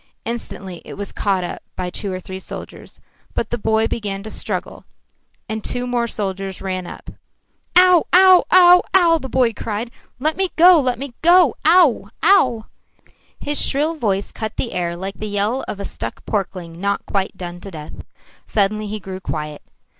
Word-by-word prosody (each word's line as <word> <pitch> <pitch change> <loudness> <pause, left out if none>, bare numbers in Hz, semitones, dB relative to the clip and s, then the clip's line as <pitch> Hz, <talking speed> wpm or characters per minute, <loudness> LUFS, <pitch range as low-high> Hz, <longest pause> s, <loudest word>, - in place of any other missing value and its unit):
Instantly 195 -6 -6
it - - -9
was 200 -1 -5
caught 195 -3 0
up 175 - -6
by 180 -1 -4
two 200 +1 -4
or 185 - -4
three 185 +1 -8
soldiers. - - -9 0.4
But 230 - -2
the 240 - -1
boy 220 +1 +1
began 200 -3 -4
to 215 - -8
struggle, - - -4 0.6
and 220 -2 -4
two 245 0 -2
more 240 -1 0
soldiers 195 -3 -4
ran 185 -2 -4
up. - - -10 0.6
"Ow 360 -1 +6
ow 370 0 +7
ow 360 -1 +7
ow!" 335 -3 +5
the 265 - -7
boy 250 -3 +2
cried. 220 +2 -4 0.3
"Let 310 +5 -1
me 380 -1 +1
go, 350 0 +7
let 255 -3 0
me 270 0 -7
go! 345 -3 +6
Ow 315 - +4
ow!" 250 - +4 0.7
His 290 0 0
shrill 300 +4 +1
voice 205 -10 -1
cut 220 0 -6
the 240 - -2
air 170 -1 -2
like 190 +3 -6
the 215 - -5
yell 210 +5 -1
of 200 - -5
a 200 - -4
stuck - - -6
porkling 180 -5 -4
not 200 0 -1
quite 195 -1 -2
done 175 -1 -7
to 195 - -8
death. 155 -4 -9 0.5
Suddenly 215 +1 0
he 215 +1 -4
grew 190 -1 -7
quiet. 150 -4 -5
215 Hz, 175 wpm, -20 LUFS, 195-275 Hz, 0.7 s, ow